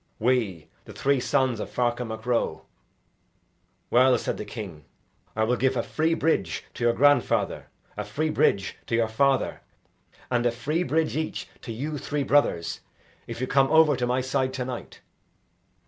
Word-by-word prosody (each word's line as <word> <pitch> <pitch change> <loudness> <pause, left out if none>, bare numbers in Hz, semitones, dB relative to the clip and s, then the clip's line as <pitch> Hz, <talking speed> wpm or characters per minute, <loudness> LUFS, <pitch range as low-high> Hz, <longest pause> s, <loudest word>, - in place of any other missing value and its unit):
"We, 110 -9 0 0.2
the - - -11
three 140 -1 +1
sons 130 -3 +1
of - - -4
Ferchar 120 0 0
Mac 110 0 -7
Ro." 120 -1 -1 1.3
"Well," 125 +1 +5
said - - -3
the 105 - -5
king, 100 - -8 0.5
"I 110 - +1
will 120 +3 +1
give 130 +1 +1
a 115 - +1
free 160 +1 0
bridge 95 - 0
to - - -5
your 120 0 +4
grandfather, 145 +4 +2 0.3
a - - -3
free 155 +1 -2
bridge 100 -9 +1
to 115 - 0
your 115 -1 +2
father, 135 +4 +1 0.7
and 120 -1 +2
a - - +2
free 150 +8 -2
bridge 160 -2 0
each 155 0 -3
to 115 - -7
you 145 +6 -4
three 145 +1 -2
brothers, 85 - +1 0.5
if - - -6
you 130 - 0
come 135 +1 +3
over 160 -2 +6
to 125 -1 -1
my 125 +1 +1
side 130 0 -1
to 130 -1 -2
night." 125 -2 -7
125 Hz, 170 wpm, -26 LUFS, 115-140 Hz, 1.3 s, over